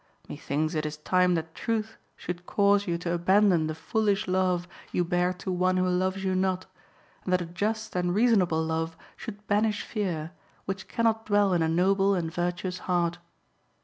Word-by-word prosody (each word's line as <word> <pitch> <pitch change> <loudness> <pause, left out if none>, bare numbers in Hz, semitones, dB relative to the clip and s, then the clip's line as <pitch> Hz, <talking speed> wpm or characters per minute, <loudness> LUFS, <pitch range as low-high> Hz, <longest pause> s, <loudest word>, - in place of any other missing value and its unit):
(6) - - -28
Methinks 155 +3 -2
it 155 -1 -1
is 155 0 -4
time 180 +3 +2
that 160 0 -4
truth 225 +1 -2 0.2
should 180 0 -6
cause 200 0 +3
you 170 -1 0
to 170 0 -3
abandon 180 -1 +3
the 155 - -3
foolish 205 +4 0
love 185 -1 +1 0.2
you 180 - +1
bear 175 +1 +1
to 185 +1 -5
one 185 +1 +2
who 185 0 +2
loves 185 +1 0
you 190 -1 0
not, 185 0 0 0.6
and 185 - -3
that 180 0 +3
a - - -6
just 210 +6 -3
and 180 0 0
reasonable 195 -8 +3
love 160 0 -2 0.2
should 210 -2 -9
banish 210 0 +1
fear, 170 -7 -3 0.3
which 190 0 -4
cannot 225 -1 0
dwell 205 -2 +3
in 175 - +2
a 160 - +2
noble 195 +4 +3
and 165 -3 -2
virtuous 180 +1 -2
heart. 175 -1 +1
185 Hz, 180 wpm, -27 LUFS, 175-200 Hz, 0.6 s, cause